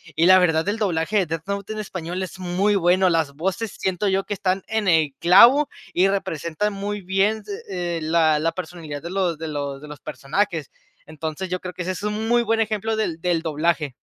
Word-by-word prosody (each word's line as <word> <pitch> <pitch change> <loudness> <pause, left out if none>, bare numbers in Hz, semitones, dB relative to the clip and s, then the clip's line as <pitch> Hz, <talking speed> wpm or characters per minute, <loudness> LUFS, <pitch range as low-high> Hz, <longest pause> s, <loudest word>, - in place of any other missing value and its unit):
Y 165 +2 +3
la 185 +1 +8
verdad, 165 0 +2
el 210 +2 -1
doblaje 190 +1 +1
de 185 - +1
Death 165 0 -4
Note, 200 +1 -3
en 215 - -5
español 185 -2 -5
es 185 - -7
muy 185 +3 +1
bueno. 185 0 +3
Las 160 -4 +1
voces 190 +7 -3
siento 190 +2 -1
yo 195 0 +1
que 205 - -3
están 190 -1 -1
en 220 -2 -1
el 155 -4 +3
clavo 240 - +7 0.2
y 185 +2 +4
representan 195 +1 -2
muy 205 +1 -4
bien, 195 +4 +1
d 205 - -9 0.2
eh, 175 -3 -2
la 155 -1 +3
la 165 +2 +1
personalidad 165 -5 -7
de 170 - -6
los 180 -5 0
de 160 0 -5
los 140 -2 -4
de - - -9
los 150 0 -10
personajes. 155 0 -2 0.4
Entonces 155 +4 -5
yo 185 0 -2
creo 180 -1 -7
que 180 - -4
ese 185 - -2
es 185 - -6
un 210 +1 -2
muy 240 0 +4
buen 225 -1 0
ejemplo 220 0 0
del 170 -7 -2
del 175 -2 0
doblaje. 155 -2 0
180 Hz, 220 wpm, -23 LUFS, 160-200 Hz, 0.4 s, la